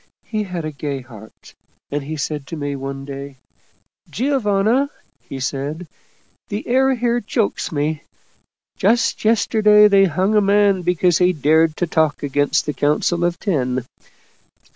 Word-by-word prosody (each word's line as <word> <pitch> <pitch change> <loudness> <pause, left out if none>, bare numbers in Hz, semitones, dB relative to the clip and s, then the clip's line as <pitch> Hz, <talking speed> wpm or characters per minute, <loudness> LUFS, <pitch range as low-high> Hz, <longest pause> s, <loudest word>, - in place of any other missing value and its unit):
He 215 -1 -3
had 180 -4 -5
a 155 - -4
gay 140 -2 -4
heart, 110 -4 -15 0.4
and 145 +1 -1
he 155 +3 -5
said 145 -1 -4
to - - -6
me 145 -2 -3
one 135 0 -6
day, 140 -1 -8 0.4
' - - -38
Giovanna,' 245 0 +1 0.3
he 135 - -9
said, 145 +6 -4 0.3
' - - -41
the 205 +2 -5
air 265 +2 +3
here 240 0 0
chokes 215 0 -2
me. 150 0 -2 0.8
Just 230 +5 +1
yesterday 210 -1 +5
they 200 -1 +5
hung 185 +4 0
a 210 - +4
man 200 -1 +3
because 175 -1 +2
he 180 0 +3
dared 155 +1 +2
to 175 - 0
talk 160 -3 0
against 145 +2 +1
the 150 - -2
Council 150 +4 0
of 175 0 0
Ten. 130 - -1
170 Hz, 155 wpm, -20 LUFS, 145-205 Hz, 0.8 s, yesterday